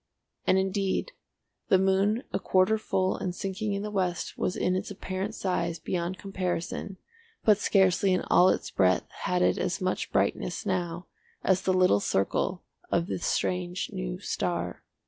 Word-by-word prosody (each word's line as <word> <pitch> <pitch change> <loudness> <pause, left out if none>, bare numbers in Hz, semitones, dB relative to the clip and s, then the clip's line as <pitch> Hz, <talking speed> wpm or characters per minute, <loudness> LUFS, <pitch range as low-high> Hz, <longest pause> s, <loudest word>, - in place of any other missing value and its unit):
And, 185 - +5
indeed 195 - 0 0.6
the 190 - +5
moon 195 +5 +2
a - - +1
quarter 190 +4 +3
full 190 -3 0
and 180 -1 -3
sinking 195 +2 -3
in 200 0 -2
the 210 - -4
west 180 -4 -1
was 180 - -1
in 180 - +1
its 185 - -3
apparent 195 +1 -4
size 175 -3 -1
beyond 175 +1 -3
comparison, 185 0 -3 0.5
but 215 -2 +5
scarcely 190 -1 +3
in 185 - +2
all 180 +1 +5
its - - -1
breadth 95 -1 +2 0.2
had 180 0 +2
it - - +2
as 180 +1 -1
much 185 -1 -2
brightness - - 0
now 175 -3 -2 0.4
as 190 0 +3
the 190 - +1
little 180 - +4
circle 100 - 0 0.3
of 170 - +1
the - - -3
strange 180 +1 -1
new - - -3
star. - - -2
185 Hz, 160 wpm, -28 LUFS, 180-195 Hz, 0.6 s, And